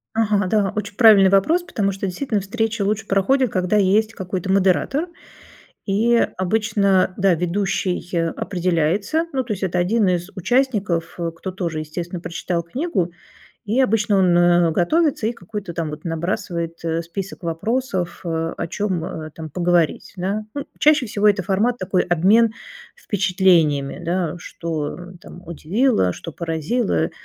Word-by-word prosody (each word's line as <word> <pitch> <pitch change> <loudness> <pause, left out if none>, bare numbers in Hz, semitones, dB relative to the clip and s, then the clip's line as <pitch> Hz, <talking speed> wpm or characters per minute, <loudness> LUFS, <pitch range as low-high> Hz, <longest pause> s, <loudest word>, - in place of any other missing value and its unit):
Ага, 210 -3 +2
да, 200 0 +1
очень 205 -1 -4
правильный 205 -5 +7
вопрос, 310 - +3
потому 200 - -1
что 195 +1 -4
действительно 210 +3 -2
встречи 225 +2 -2
лучше 210 +1 -1
проходят, 245 +6 +2
когда 185 +2 +1
есть 210 +3 +2
какой-то 190 0 -4
модератор, 195 - +2 0.8
и 225 +4 +2 0.2
обычно, 195 -1 +2
да, 195 -1 +3
ведущий 180 +1 -1 0.2
определяется. 185 - 0
Ну, 260 -1 0
то 230 - -3
есть 195 - -6
это 180 -1 0
один 205 +4 +2
из 180 +1 0
участников, 200 -5 0
э, 170 -1 -2
кто 190 +3 -6
тоже, 170 -4 -3
естественно, 170 +3 -5
прочитал 170 0 -3
книгу. 185 - -2 0.6
И 220 +5 0
обычно 210 -4 +2
он, 180 -2 +4
э, 175 -1 +4
готовится 280 - +1
и 230 - 0
какой-то 200 -4 -7
там 165 -2 -2
вот 150 +2 -9
набрасывает, 170 0 -3
э, 165 0 -1
список 185 +3 -7
вопросов, 185 +2 -2
о 165 0 -2
чем, 185 -4 -2
э, 155 -2 -6
там 160 -1 -8
поговорить, 175 0 0
да. 195 +4 -2
Ну, 285 - -4
чаще 300 -3 +4
всего 210 0 +2
это 200 -2 +2
формат 205 +7 +1
такой- 185 0 0
обмен 200 +7 +3 0.4
впечатлениями, 180 -8 +1
да: 175 -1 -1
что, 165 -4 -4
м, 180 0 -11
там 175 - -13
удивило, 170 - +1
что 165 - -8
поразило, 165 - -1
190 Hz, 150 wpm, -21 LUFS, 170-215 Hz, 0.8 s, правильный